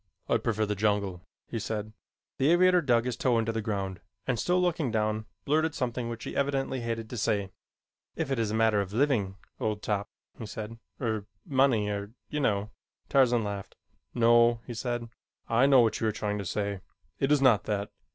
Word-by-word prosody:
"I -, -, +3 dB
prefer 110 Hz, -2 st, 0 dB
the 105 Hz, -, -1 dB
jungle," 100 Hz, -3 st, 0 dB, 0.3 s
he 115 Hz, -, -3 dB
said. 110 Hz, 0 st, -4 dB, 0.5 s
The 135 Hz, +2 st, +4 dB
aviator 180 Hz, +1 st, +5 dB
dug 120 Hz, -5 st, +2 dB
his 125 Hz, -2 st, -1 dB
toe 120 Hz, 0 st, +2 dB
into 115 Hz, 0 st, +1 dB
the 110 Hz, 0 st, -2 dB
ground 100 Hz, -4 st, -3 dB, 0.2 s
and 125 Hz, -3 st, 0 dB
still 180 Hz, +7 st, +2 dB
looking 170 Hz, -6 st, +1 dB
down, 110 Hz, 0 st, -1 dB, 0.2 s
blurted 155 Hz, +2 st, +1 dB
something 120 Hz, -2 st, -2 dB
which 115 Hz, -1 st, -6 dB
he -, -, -6 dB
evidently 135 Hz, -2 st, 0 dB
hated 115 Hz, -1 st, -3 dB
to 125 Hz, -, -4 dB
say. 100 Hz, -3 st, 0 dB, 0.6 s
"If 135 Hz, -, -2 dB
it 135 Hz, -, 0 dB
is 110 Hz, -2 st, +1 dB
a 110 Hz, -, -1 dB
matter 110 Hz, -2 st, +3 dB
of 100 Hz, 0 st, -5 dB
living, 115 Hz, -7 st, +1 dB, 0.2 s
old 105 Hz, -1 st, -2 dB
top," 100 Hz, -1 st, -1 dB, 0.3 s
he 115 Hz, -, -5 dB
said, 110 Hz, +1 st, -7 dB, 0.2 s
"er 110 Hz, -5 st, -2 dB, 0.2 s
money, 130 Hz, -6 st, +3 dB
er 100 Hz, +1 st, -4 dB, 0.2 s
you 150 Hz, -, -2 dB
know 105 Hz, -5 st, 0 dB, 0.2 s
" -, -, -46 dB
Tarzan 125 Hz, -4 st, +4 dB
laughed. 100 Hz, -2 st, -5 dB, 0.4 s
"No," 120 Hz, 0 st, +5 dB
he 120 Hz, -, -6 dB
said. 120 Hz, 0 st, -3 dB, 0.4 s
"I 120 Hz, +4 st, +4 dB
know 135 Hz, -3 st, +7 dB
what 115 Hz, -2 st, +1 dB
you 110 Hz, -, +1 dB
are -, -, +2 dB
trying 105 Hz, -1 st, -2 dB
to 100 Hz, -, -4 dB
say. 100 Hz, +1 st, -2 dB, 0.4 s
It 135 Hz, +1 st, +1 dB
is 150 Hz, -, +5 dB
not 125 Hz, -6 st, +4 dB
that. 100 Hz, -1 st, -2 dB
115 Hz, 200 wpm, -29 LUFS, 105-130 Hz, 0.6 s, know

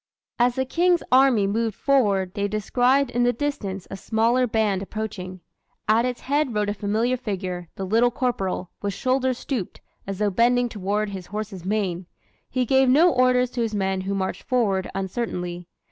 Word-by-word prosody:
As 245 Hz, 0 st, +3 dB
the 260 Hz, -, 0 dB
King's 345 Hz, +5 st, +2 dB
army 255 Hz, -5 st, +5 dB
moved 220 Hz, +1 st, -1 dB
forward 200 Hz, -9 st, +2 dB
they 200 Hz, 0 st, -1 dB
descried 245 Hz, +6 st, +1 dB
in 245 Hz, -, 0 dB
the 245 Hz, 0 st, +4 dB
distance 220 Hz, -8 st, -4 dB
a -, -, -4 dB
smaller 230 Hz, +5 st, +1 dB
band 215 Hz, -4 st, +1 dB
approaching. 195 Hz, -3 st, -6 dB, 0.5 s
At 225 Hz, +3 st, +4 dB
its 250 Hz, -1 st, -4 dB
head 280 Hz, -3 st, 0 dB
rode 210 Hz, -1 st, +1 dB
a -, -, 0 dB
familiar 215 Hz, +5 st, 0 dB
figure, 185 Hz, -7 st, -4 dB
the 195 Hz, -, -4 dB
Little 230 Hz, +5 st, +3 dB
Corporal, 195 Hz, -8 st, -2 dB
with 200 Hz, -2 st, -2 dB
shoulders 260 Hz, -1 st, 0 dB
stooped, 245 Hz, -10 st, -4 dB, 0.3 s
as 195 Hz, -1 st, -4 dB
though 205 Hz, 0 st, +1 dB
bending 245 Hz, +4 st, +3 dB
toward 205 Hz, 0 st, -2 dB
his 190 Hz, -2 st, -7 dB
horse's 205 Hz, -3 st, -6 dB
mane. 190 Hz, -3 st, -2 dB, 0.4 s
He 255 Hz, 0 st, 0 dB
gave 265 Hz, +1 st, +4 dB
no 315 Hz, +6 st, +5 dB
orders 250 Hz, -1 st, +3 dB
to 245 Hz, -, -2 dB
his 225 Hz, -2 st, -1 dB
men 190 Hz, -1 st, 0 dB
who 195 Hz, +1 st, -2 dB
marched 190 Hz, -1 st, -2 dB
forward 210 Hz, -7 st, 0 dB
uncertainly. 180 Hz, -3 st, -4 dB
215 Hz, 175 wpm, -24 LUFS, 195-250 Hz, 0.5 s, army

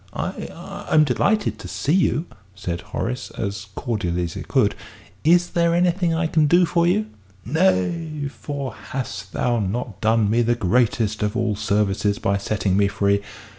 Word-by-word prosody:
"I -, -, -3 dB, 0.4 s
I'm 155 Hz, -, +6 dB
delighted 200 Hz, -, +1 dB
to -, -, -8 dB
see 145 Hz, -, -1 dB
you," 175 Hz, -3 st, +2 dB, 0.3 s
said 90 Hz, -3 st, -4 dB
Horace, 125 Hz, +1 st, -4 dB
as 100 Hz, -1 st, -4 dB
cordially 90 Hz, -9 st, -1 dB
as 85 Hz, -, -4 dB
he -, -, -6 dB
could. -, -, +2 dB, 0.5 s
"Is 175 Hz, +2 st, +4 dB
there 170 Hz, -1 st, +2 dB
anything 175 Hz, 0 st, +2 dB
I 165 Hz, +1 st, +1 dB
can 155 Hz, -1 st, +3 dB
do 175 Hz, +4 st, +5 dB
for 170 Hz, 0 st, +2 dB
you?" 210 Hz, +5 st, +2 dB, 0.4 s
"Nay, 155 Hz, -, +1 dB
for 140 Hz, -2 st, -5 dB
hast 105 Hz, -7 st, -6 dB
thou 120 Hz, -1 st, 0 dB
not 105 Hz, +1 st, -3 dB
done 110 Hz, -1 st, +3 dB
me 115 Hz, +3 st, +2 dB
the 120 Hz, +1 st, +2 dB
greatest 110 Hz, 0 st, +1 dB
of 105 Hz, 0 st, 0 dB
all 115 Hz, -3 st, 0 dB
services 105 Hz, 0 st, +1 dB
by 100 Hz, 0 st, 0 dB
setting 100 Hz, -1 st, 0 dB
me 100 Hz, 0 st, +4 dB
free? 100 Hz, 0 st, +1 dB
120 Hz, 165 wpm, -22 LUFS, 100-160 Hz, 0.5 s, I'm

